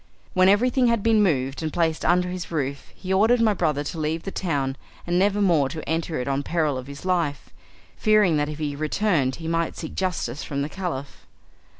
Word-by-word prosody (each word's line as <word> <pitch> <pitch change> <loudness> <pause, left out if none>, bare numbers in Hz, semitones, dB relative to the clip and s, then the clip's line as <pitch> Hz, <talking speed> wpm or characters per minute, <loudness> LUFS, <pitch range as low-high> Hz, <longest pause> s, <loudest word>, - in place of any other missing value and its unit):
When 185 +1 +5
everything 245 +5 +3
had 230 -3 +1
been 225 -2 +4
moved 135 -8 +1
and 160 -1 -2
placed 160 -1 0
under 180 +1 +2
his 180 -1 -5
roof 140 -4 -3
he 190 0 -3
ordered 225 +5 +4
my 220 -2 +4
brother 150 -6 0
to 160 +3 -5
leave 155 +2 -2
the 195 - -5
town 140 -9 -1 0.3
and 175 +1 +1
never 205 +1 +2
more 160 -8 +3
to 155 0 -7
enter 160 -1 -1
it 125 - -3
on 140 0 0
peril 155 -1 0
of 130 0 -6
his 140 +4 -9
life, 170 -6 -1 0.5
fearing 215 -6 +4
that 145 0 0
if 150 - -6
he 150 -2 -3
returned 155 -3 0
he 160 - -7
might 165 0 -1
seek 160 - -6
justice 170 -8 -2
from 140 -1 -3
the 145 - -4
Caliph. 160 -8 -6
165 Hz, 210 wpm, -24 LUFS, 145-190 Hz, 0.5 s, When